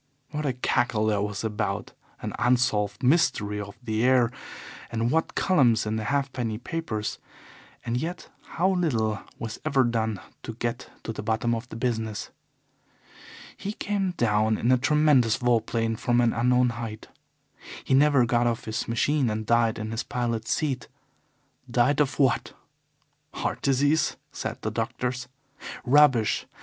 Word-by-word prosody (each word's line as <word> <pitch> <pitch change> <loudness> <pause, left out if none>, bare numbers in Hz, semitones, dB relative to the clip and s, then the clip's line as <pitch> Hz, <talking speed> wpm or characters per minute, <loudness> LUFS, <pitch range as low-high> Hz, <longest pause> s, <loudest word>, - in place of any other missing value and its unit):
What 150 -1 -2
a 130 - 0
cackle 120 -3 +1
there 105 -2 +1
was 105 +1 -3
about 110 -1 -2 0.3
an - - -3
unsolved 120 -5 +1
mystery 125 -8 +2
of 100 0 -9
the 110 -1 -1
air, 125 -2 +4 0.6
and 115 +1 0
what 160 +2 0
columns 130 - +3
in 105 +1 -1
the 110 - -3
halfpenny 130 -5 -1
papers, 120 -6 -4 0.7
and 115 - -1
yet 170 +7 -4 0.3
how 185 +3 +3
little 115 - 0 0.2
was 115 -1 -6
ever 140 -4 +3
done 110 -4 -1 0.2
to - - -6
get - - -3
to - - -4
the - - -5
bottom 115 +1 0
of 115 +2 -4
the - - -8
business! 110 -3 -2 1.2
He 205 - -5
came 200 -3 -1
down 110 -5 +2
in 120 - +1
a 130 - +5
tremendous 145 -5 +4
vol 120 -2 +2
plane 115 0 -1
from 120 +1 +1
an 120 -1 +3
unknown 125 +1 +3
height. 115 -2 -6 0.7
He - - 0
never 140 -2 +5
got 120 0 +2
off 115 -1 -2
his 110 0 -3
machine 130 +3 +1
and 110 0 -3
died 115 0 +2
in 110 0 -4
his 115 +1 -2
pilot's 115 -3 -2
seat. 135 -6 -1 0.8
Died 125 +4 +2
of 145 -2 +1
what? 135 -4 +2 0.8
'Heart - - -2
disease,' 145 +3 +2 0.2
said - - -5
the - - -1
doctors. 125 0 -3 0.6
Rubbish! 130 -5 +4
120 Hz, 150 wpm, -26 LUFS, 110-135 Hz, 1.2 s, a